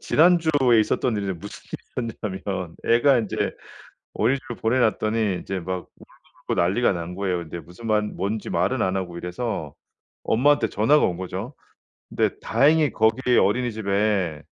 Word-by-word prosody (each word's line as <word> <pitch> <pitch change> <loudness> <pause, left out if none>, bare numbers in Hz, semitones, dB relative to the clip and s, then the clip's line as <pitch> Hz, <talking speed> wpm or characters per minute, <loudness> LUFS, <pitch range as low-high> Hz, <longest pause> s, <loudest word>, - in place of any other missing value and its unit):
지난주에 155 -8 +4
있었던 110 +1 0
일인데 100 -2 -2
무슨 100 +5 -10 0.4
일이 115 -2 -2
있었냐면 95 -4 -4
애가 120 +3 +5
인제 110 -4 -2 0.6
어린이집을 130 +2 -1
보내 115 +3 +1
놨더니 110 -4 +1
이제 95 - -4
막 90 +1 -5
울고불고 - - -6
난리가 100 +8 +2
난 85 0 -5
거예요. 95 -3 -1
근데 85 0 -7
무슨 90 +7 -12
말 105 0 +3
뭔지 105 +1 -3
말은 130 -1 0
안 95 0 0
하고 90 -2 -4
이래서 90 - -4 0.5
엄마한테 130 0 +3
전화가 125 +11 +3
온 90 - 0
거죠. 95 +8 -6 0.6
근데 - - +1
다행히 145 +3 +3
거기 115 +3 +2
어린이집에 100 - +1
110 Hz, 340 characters per minute, -24 LUFS, 95-125 Hz, 0.6 s, 애가